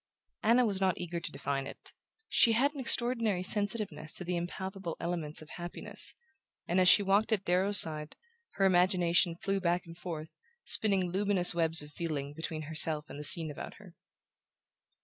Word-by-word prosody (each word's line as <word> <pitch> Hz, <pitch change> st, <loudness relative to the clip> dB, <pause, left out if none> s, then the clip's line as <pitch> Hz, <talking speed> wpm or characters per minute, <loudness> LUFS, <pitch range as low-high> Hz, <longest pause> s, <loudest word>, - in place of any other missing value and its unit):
Anna 240 Hz, +3 st, +2 dB
was 195 Hz, -3 st, -2 dB
not 190 Hz, -2 st, 0 dB
eager 175 Hz, -1 st, -5 dB
to -, -, -3 dB
define 140 Hz, 0 st, -5 dB
it. -, -, -14 dB, 0.3 s
She 230 Hz, -, +3 dB
had 275 Hz, +6 st, +1 dB
an 285 Hz, -, -9 dB
extraordinary 230 Hz, -6 st, +1 dB
sensitiveness 200 Hz, -6 st, -1 dB
to -, -, -1 dB
the 180 Hz, 0 st, -4 dB
impalpable 190 Hz, +1 st, -6 dB
elements 165 Hz, -3 st, -4 dB
of 155 Hz, -, -17 dB
happiness, 175 Hz, 0 st, -3 dB, 0.5 s
and 180 Hz, +2 st, +1 dB
as 180 Hz, -, +4 dB
she 205 Hz, -, +5 dB
walked 200 Hz, +3 st, 0 dB
at 205 Hz, -3 st, -1 dB
Darrow's 190 Hz, +3 st, +3 dB
side 155 Hz, -1 st, 0 dB, 0.4 s
her 195 Hz, -, 0 dB
imagination 180 Hz, -2 st, +1 dB
flew 195 Hz, +3 st, -3 dB
back 175 Hz, -1 st, -2 dB
and 165 Hz, 0 st, -13 dB
forth, 160 Hz, -3 st, -8 dB, 0.3 s
spinning 195 Hz, -4 st, +5 dB
luminous 195 Hz, -2 st, +4 dB
webs 165 Hz, -2 st, +2 dB
of 150 Hz, -, -14 dB
feeling 145 Hz, -3 st, -5 dB
between 160 Hz, 0 st, -6 dB
herself 155 Hz, 0 st, +4 dB
and 145 Hz, -, -9 dB
the -, -, -7 dB
scene 155 Hz, +1 st, +3 dB
about 145 Hz, -, -10 dB
her. -, -, -17 dB
175 Hz, 170 wpm, -29 LUFS, 160-195 Hz, 0.5 s, she